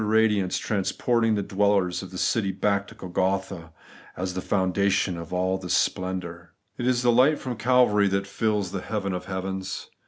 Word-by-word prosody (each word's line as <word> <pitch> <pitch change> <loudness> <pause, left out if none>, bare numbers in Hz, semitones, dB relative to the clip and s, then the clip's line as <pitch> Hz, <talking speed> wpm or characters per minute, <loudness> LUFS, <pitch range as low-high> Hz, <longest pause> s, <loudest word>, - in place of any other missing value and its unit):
radiance 105 -4 +2
transporting 115 +2 0
the 100 - -1
dwellers 100 -2 +1
of 95 - -8
the 95 - -8
city 100 0 +1
back 100 +1 0
to - - -13
Golgotha, 95 -2 -2 0.5
as 90 0 -3
the 95 - -3
fonntainhead 95 0 +1
of 85 -1 -8
all 95 +1 0
this 90 -2 -1
splendour. 90 -2 -3 0.2
It 120 - -3
is 125 -1 +1
light 130 +5 +5
from 125 -2 -5
Calvary 110 -3 +3
that 100 0 0
fills 100 -1 -1
the 95 - -4
heaven 100 -2 -3
of 90 - -4
heavens. 95 0 -5
95 Hz, 165 wpm, -25 LUFS, 95-105 Hz, 0.5 s, light